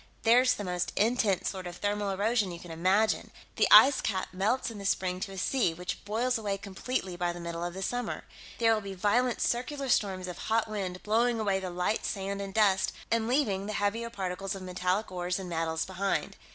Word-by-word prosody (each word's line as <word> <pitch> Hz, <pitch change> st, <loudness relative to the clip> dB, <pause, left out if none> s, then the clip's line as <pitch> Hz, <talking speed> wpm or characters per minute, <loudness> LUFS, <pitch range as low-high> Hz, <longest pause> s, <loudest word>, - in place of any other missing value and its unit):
There's 250 Hz, +2 st, +5 dB
the 205 Hz, -, -5 dB
most 180 Hz, -2 st, -2 dB
intense 215 Hz, -3 st, +2 dB
sort 185 Hz, -2 st, -4 dB
of 175 Hz, -, -7 dB
thermal 205 Hz, 0 st, -1 dB
erosion 205 Hz, +1 st, +1 dB
you 170 Hz, -, -6 dB
can 175 Hz, -1 st, -10 dB
imagine 190 Hz, +7 st, +2 dB, 0.3 s
the -, -, +3 dB
ice 265 Hz, -1 st, +8 dB
cap 190 Hz, -4 st, -1 dB
melts 215 Hz, +7 st, 0 dB
in 215 Hz, -, -8 dB
the 200 Hz, -, -7 dB
spring 185 Hz, -2 st, 0 dB
to 195 Hz, -, -4 dB
a 195 Hz, -, -8 dB
sea, 185 Hz, -3 st, +1 dB
which 180 Hz, +2 st, -5 dB
boils 230 Hz, +4 st, 0 dB
away 200 Hz, -2 st, -2 dB
completely 195 Hz, 0 st, -4 dB
by 175 Hz, 0 st, -1 dB
the 175 Hz, -, -8 dB
middle 170 Hz, 0 st, -4 dB
of 175 Hz, 0 st, -4 dB
the 190 Hz, -, -4 dB
summer. 245 Hz, +3 st, -3 dB, 0.3 s
There 225 Hz, -1 st, +4 dB
will 215 Hz, -, 0 dB
be 195 Hz, -1 st, -7 dB
violent 235 Hz, +6 st, +1 dB
circular 270 Hz, +3 st, -1 dB
storms 190 Hz, -5 st, +1 dB
of 180 Hz, -, -7 dB
hot 225 Hz, 0 st, 0 dB
wind, 190 Hz, -4 st, -4 dB
blowing 230 Hz, +2 st, +2 dB
away 200 Hz, -3 st, +1 dB
the 185 Hz, -1 st, -4 dB
light 180 Hz, +4 st, -1 dB
sand 200 Hz, 0 st, -3 dB
and 195 Hz, -1 st, -5 dB
dust 195 Hz, -2 st, +3 dB, 0.2 s
and 225 Hz, -1 st, +2 dB
leaving 215 Hz, -7 st, +1 dB
the 215 Hz, -, -3 dB
heavier 210 Hz, +4 st, -1 dB
particles 195 Hz, -2 st, -4 dB
of 190 Hz, -, -7 dB
metallic 185 Hz, +3 st, -1 dB
ores 180 Hz, 0 st, -2 dB
and 190 Hz, -2 st, -6 dB
metals 160 Hz, -1 st, -1 dB
behind. 190 Hz, +1 st, -2 dB
200 Hz, 210 wpm, -29 LUFS, 185-225 Hz, 0.3 s, ice